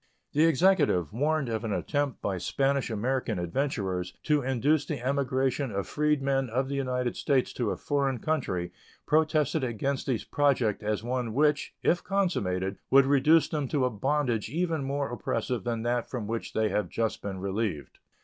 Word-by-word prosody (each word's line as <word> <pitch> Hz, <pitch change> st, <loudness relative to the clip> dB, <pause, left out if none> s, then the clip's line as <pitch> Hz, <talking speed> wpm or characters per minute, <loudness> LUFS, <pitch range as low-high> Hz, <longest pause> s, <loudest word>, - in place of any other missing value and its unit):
The 155 Hz, +3 st, +4 dB
Executive, 150 Hz, -, +3 dB
warned 150 Hz, +3 st, +1 dB
of 110 Hz, -1 st, -2 dB
an 115 Hz, -, -2 dB
attempt 145 Hz, +4 st, -1 dB
by 95 Hz, -2 st, -1 dB
Spanish 135 Hz, +6 st, 0 dB
American 115 Hz, 0 st, -1 dB
adventurers 95 Hz, -, -2 dB
to 150 Hz, -1 st, +2 dB
induce 135 Hz, +4 st, +1 dB
the 145 Hz, -3 st, -4 dB
emigration 135 Hz, 0 st, 0 dB
of 100 Hz, -1 st, -2 dB
freedmen 140 Hz, -3 st, +1 dB
of 130 Hz, +4 st, -1 dB
the 140 Hz, -, -2 dB
United 125 Hz, -2 st, -1 dB
States 135 Hz, -3 st, +1 dB
to 120 Hz, -4 st, -1 dB
a -, -, -2 dB
foreign 140 Hz, -3 st, 0 dB
country, 105 Hz, -, -2 dB, 0.3 s
protested 155 Hz, -1 st, +2 dB
against 130 Hz, +4 st, -2 dB
the 130 Hz, -4 st, +2 dB
project 130 Hz, -7 st, +2 dB
as 105 Hz, 0 st, -2 dB
one 120 Hz, -2 st, -2 dB
which, 150 Hz, +1 st, +2 dB
if 175 Hz, -, +2 dB
consummated, 100 Hz, -, -1 dB
would 135 Hz, 0 st, +6 dB
reduce 145 Hz, +4 st, +4 dB
them 150 Hz, -3 st, -2 dB
to 135 Hz, -1 st, +1 dB
a 125 Hz, -, 0 dB
bondage 120 Hz, -1 st, 0 dB
even 165 Hz, 0 st, -1 dB
more 140 Hz, -1 st, -2 dB
oppressive 120 Hz, -2 st, -2 dB
than 115 Hz, -2 st, -2 dB
that 120 Hz, 0 st, -1 dB
from 120 Hz, -5 st, -4 dB
which 115 Hz, +2 st, -4 dB
they 110 Hz, -1 st, +1 dB
have 100 Hz, -2 st, -1 dB
just 115 Hz, -1 st, -2 dB
been 100 Hz, -2 st, -4 dB
relieved. 95 Hz, -5 st, -3 dB
130 Hz, 170 wpm, -28 LUFS, 110-145 Hz, 0.3 s, would